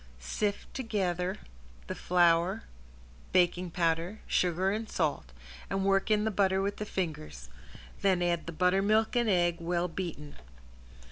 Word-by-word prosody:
Sift 200 - -3
together 190 -6 -1 0.5
the - - -4
flour, 175 +3 +2 0.7
baking 180 0 +2
powder, 170 +4 0
sugar 180 +2 +1
and 220 +2 -3
salt, 150 - -1 0.4
and 195 0 -1
work 195 +1 +2
in 210 -1 +3
the 220 - 0
butter 190 -1 +2
with 200 +1 -1
the 210 - -5
fingers, 75 - -4 0.5
then 185 -3 +2
add 170 -2 0
the - - -3
buttermilk 195 +7 +2
and 240 -2 +2
egg 175 -3 +2
well 170 +1 -1
beaten. 165 -5 -6
180 Hz, 135 wpm, -30 LUFS, 170-200 Hz, 0.7 s, in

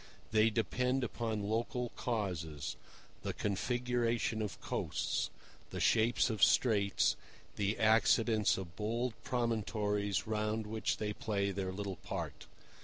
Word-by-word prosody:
They 110 0 +5
depend 125 - 0
upon 115 -3 -2
local 120 +2 -1
causes—the 85 - -4
configuration 120 +1 0
of 105 -2 -4
coasts, - - -1 0.4
the - - -5
shapes 115 +2 +3
of 110 -3 0
straits, 100 -5 +4 0.4
the 100 +1 0
accidents 110 0 +4
of 90 -3 -7
bold 115 +4 -1
promontories 105 -4 0
round 110 0 -1
which 110 +1 -1
they 105 -1 -2
play 100 -2 -1
their 95 -1 -2
little 100 -1 -4
part. - - -5
110 Hz, 110 wpm, -34 LUFS, 100-115 Hz, 0.4 s, They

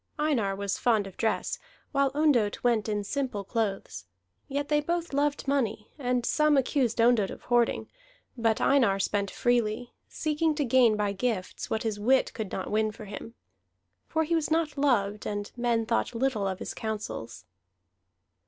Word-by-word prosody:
Einar 260 -11 +1
was 200 0 -2
fond 220 -4 +2
of 195 - -10
dress, 225 - -1 0.3
while 275 -1 +2
Ondott 270 -9 +2
went 230 -3 +2
in 205 -1 -1
simple 250 -2 -2
clothes; 195 - -3 0.4
yet 285 +1 -2
they 295 0 +2
both 340 +1 -2
loved 285 0 0
money, 260 -6 -1
and 250 -2 0
some 300 0 +3
accused 260 -3 +1
Ondott 230 -4 +4
of - - -9
hoarding, 240 -1 +1 0.5
but 225 -2 +1
Einar 235 -9 +4
spent 200 0 0
freely, 240 0 0 0.2
seeking 310 0 0
to 290 -2 0
gain 240 -3 +4
by 205 -1 0
gifts 200 -3 -3
what 220 - -1
his 215 -2 -2
wit 260 +5 +3
could 220 -4 -5
not - - -4
win 215 0 +1
for 215 +1 -10
him. 210 +3 -8 0.7
For 320 0 +1
he 330 +2 -1
was 320 -2 +1
not 320 -2 +1
loved, 215 -8 +1
and 205 0 -4
men 240 -2 +1
thought 230 +1 0
little 230 -5 0
of 190 -1 -2
his - - -5
counsels. 205 - -5
235 Hz, 165 wpm, -28 LUFS, 210-280 Hz, 0.7 s, Ondott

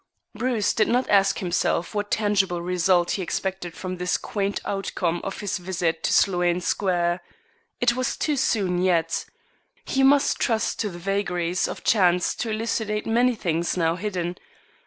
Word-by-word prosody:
Bruce 235 -3 0
did 215 - +2
not 250 +2 +1
ask 195 -1 +4
himself 175 0 -1
what 205 -1 -2
tangible 200 -4 +1
result 175 0 +2
he 195 - -1
expected 185 -1 -3
from 185 -1 -5
this 180 0 0
quaint 200 -4 -2
outcome 180 -3 -2
of 195 - -5
his 205 -2 -2
visit 175 -3 -2
to - - 0
Sloane 175 -2 +3
Square. 175 -1 0 0.6
It 240 -1 +3
was 255 +1 -1
too 300 - 0
soon 195 -9 +1
yet. 170 -3 +1 0.6
He 270 - 0
must 275 +1 +4
trust 225 -2 0
to 210 - 0
the 175 - -9
vagaries 180 -2 -1
of - - -7
chance 180 -4 +3
to 230 - -3
elucidate 215 -1 -2
many 240 +2 +2
things 170 -3 -1
now 165 -1 +2
hidden. 180 -2 -3
190 Hz, 155 wpm, -24 LUFS, 175-215 Hz, 0.6 s, ask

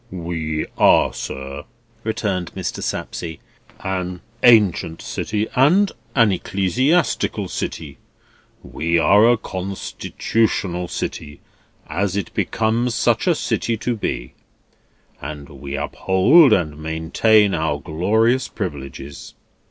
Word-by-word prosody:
"We 85 -4 -3
are, - - +5
sir," 70 +2 -6 0.4
returned 100 -5 -2
Mr. - - -4
Sapsea, 80 -2 -4 0.4
"an 90 -2 -3 0.2
ancient 105 -8 +4
city, 105 0 -2
and 175 +10 +4 0.2
an 115 -5 +5
ecclesiastical 120 - 0
city. 70 -4 -5 0.6
We 85 +2 -1
are 105 +7 +5
a 120 - +3
constitutional 95 -1 -2
city, 75 -3 -5 0.5
as 95 +5 -2
it 100 - -4
becomes 115 +2 0
such - - +1
a - - +4
city 115 -1 -1
to 120 +2 -2
be, 65 - -4 0.9
and 75 -2 -7
we 70 0 -7
uphold 95 - +4
and 75 -7 +1
maintain 80 +7 +2
our 80 -3 -1
glorious 110 - +1
privileges." 70 - -7
95 Hz, 105 wpm, -21 LUFS, 80-110 Hz, 0.9 s, are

